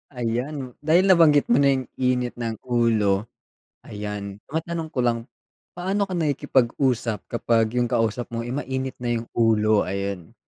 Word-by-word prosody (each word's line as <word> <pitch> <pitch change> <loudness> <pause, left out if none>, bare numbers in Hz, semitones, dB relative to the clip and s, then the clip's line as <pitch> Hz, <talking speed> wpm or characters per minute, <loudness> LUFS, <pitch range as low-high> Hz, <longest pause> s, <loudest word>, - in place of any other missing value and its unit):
Ayan, 125 +3 -3
dahil 160 +5 +4
nabanggit 160 -6 +5
mo 120 - +6
na 140 -1 +5
yung 130 -1 -2
init 125 -1 +1
ng 115 -1 -2
ulo, 110 -4 +1 0.6
ayan. 105 -1 -6
Matanong 165 +1 -3
ko 125 - -1
lang, 120 -1 +2 0.6
paano 190 +3 0
ka 195 - -8
nakikipag-usap 130 - +1
kapag 115 -1 +1
yung 120 -1 +1
kausap 115 +1 0
mo, 115 - -2
eh, 120 - -4
mainit 130 -1 -3
na 120 -1 0
yung 115 0 -5
ulo? 110 -2 +3
Ayan. 100 -2 -4
120 Hz, 150 wpm, -24 LUFS, 115-140 Hz, 0.6 s, mo